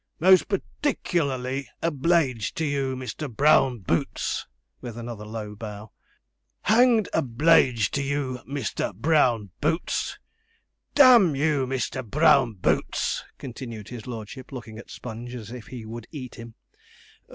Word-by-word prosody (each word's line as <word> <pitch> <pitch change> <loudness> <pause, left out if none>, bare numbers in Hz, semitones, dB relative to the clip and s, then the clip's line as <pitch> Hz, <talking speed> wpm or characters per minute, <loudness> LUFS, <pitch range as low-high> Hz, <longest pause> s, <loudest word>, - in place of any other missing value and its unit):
Most 185 +2 +6
particklarly 140 - -1 0.2
obl_e_ged 150 - +1
to 160 - -1
you, 140 -2 -1
Mr. 130 +2 -5
Brown 130 -2 +4
Boots,' 85 -2 -1 0.3
with 120 -2 -7
another 115 -3 -7
low 105 -1 -6
bow. 105 0 -8 0.7
'Hang'd 230 -2 +4
obl_e_ged 125 -4 +3
to 140 - -1
you, 135 -2 -2
Mr. 135 -8 -3
Brown 120 - +2
Boots! 160 +3 -1 0.8
D 285 - +8
n 230 - +7
you, 145 -2 +1
Mr. 130 0 -2
Brown 135 -1 +4
Boots!' 90 - 0
continued 115 -4 -8
his 120 -2 -8
lordship, 120 +3 -8
looking 115 -4 -8
at - - -12
Sponge 120 +1 -7
as 115 -2 -8
if 125 -2 -9
he 120 -4 -8
would 115 +1 -8
eat 130 -6 -7
him. 115 -1 -11
130 Hz, 130 wpm, -25 LUFS, 115-150 Hz, 0.8 s, D